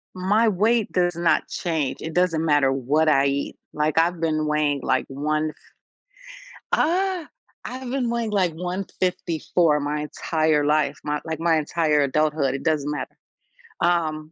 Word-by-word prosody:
my 205 Hz, +5 st, +2 dB
weight 215 Hz, +2 st, +2 dB
does 175 Hz, -1 st, +1 dB
not 170 Hz, 0 st, +1 dB
change. 160 Hz, -6 st, -2 dB
It 160 Hz, -, -5 dB
doesn't 175 Hz, -2 st, +1 dB
matter 145 Hz, -4 st, +3 dB
what 140 Hz, +4 st, +1 dB
I 140 Hz, -2 st, +4 dB
eat. 140 Hz, 0 st, -1 dB, 0.2 s
Like, 150 Hz, 0 st, -1 dB
I've 170 Hz, +1 st, +1 dB
been 155 Hz, -2 st, 0 dB
weighing, 150 Hz, -2 st, +1 dB
like, -, -, 0 dB
one 155 Hz, +3 st, -2 dB, 1.2 s
ah, 365 Hz, +1 st, +1 dB, 0.4 s
I've 255 Hz, 0 st, -6 dB
been 255 Hz, -3 st, -1 dB
weighing 235 Hz, -2 st, -1 dB
like 185 Hz, -5 st, +1 dB
154 175 Hz, -3 st, -1 dB
my 150 Hz, +1 st, -2 dB
entire 155 Hz, 0 st, 0 dB
life, 150 Hz, -1 st, +1 dB
my 150 Hz, 0 st, -1 dB
like, 160 Hz, -1 st, -4 dB
my 165 Hz, -1 st, +3 dB
entire 155 Hz, -1 st, +1 dB
adulthood, 145 Hz, -1 st, +1 dB
it 135 Hz, -, -4 dB
doesn't 150 Hz, -3 st, 0 dB
matter. 150 Hz, -, -5 dB, 0.7 s
Um, 155 Hz, -3 st, 0 dB
160 Hz, 145 wpm, -23 LUFS, 150-180 Hz, 1.2 s, I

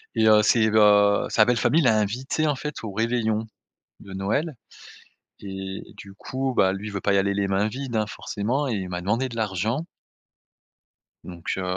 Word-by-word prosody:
et 110 Hz, -1 st, +3 dB
heu, 105 Hz, -1 st, +7 dB
c'est, 110 Hz, +1 st, +4 dB
heu, 105 Hz, -1 st, +5 dB
sa 110 Hz, -, +4 dB
belle 120 Hz, 0 st, +2 dB
famille 160 Hz, +9 st, +3 dB
l'a 115 Hz, -6 st, +4 dB
invité, 130 Hz, +9 st, -1 dB
en 145 Hz, -, +1 dB
fait, 150 Hz, 0 st, -6 dB
au 110 Hz, -, -5 dB
réveillon 110 Hz, 0 st, 0 dB, 0.5 s
de 95 Hz, -, -12 dB
Noël 125 Hz, -, -2 dB, 0.9 s
et 95 Hz, -1 st, -6 dB, 0.2 s
du 100 Hz, -1 st, -11 dB
coup, 130 Hz, +5 st, -3 dB
bah, 95 Hz, 0 st, +4 dB
lui 100 Hz, +2 st, -6 dB
veut 100 Hz, -2 st, -5 dB
pas 100 Hz, -, +1 dB
y -, -, +4 dB
aller 100 Hz, +1 st, +1 dB
les 100 Hz, 0 st, 0 dB
mains 95 Hz, +2 st, +1 dB
vides, 125 Hz, 0 st, -5 dB
hein, 110 Hz, -1 st, 0 dB
forcément 120 Hz, +8 st, -2 dB
et 115 Hz, -, -1 dB
il 95 Hz, -2 st, -4 dB
m'a 90 Hz, 0 st, -4 dB
demandé 115 Hz, +8 st, 0 dB
de 115 Hz, -, -9 dB
l'argent. 110 Hz, -, -2 dB, 1.4 s
Donc 85 Hz, -2 st, -7 dB
heu, 95 Hz, -, -3 dB
110 Hz, 190 wpm, -24 LUFS, 100-120 Hz, 1.4 s, heu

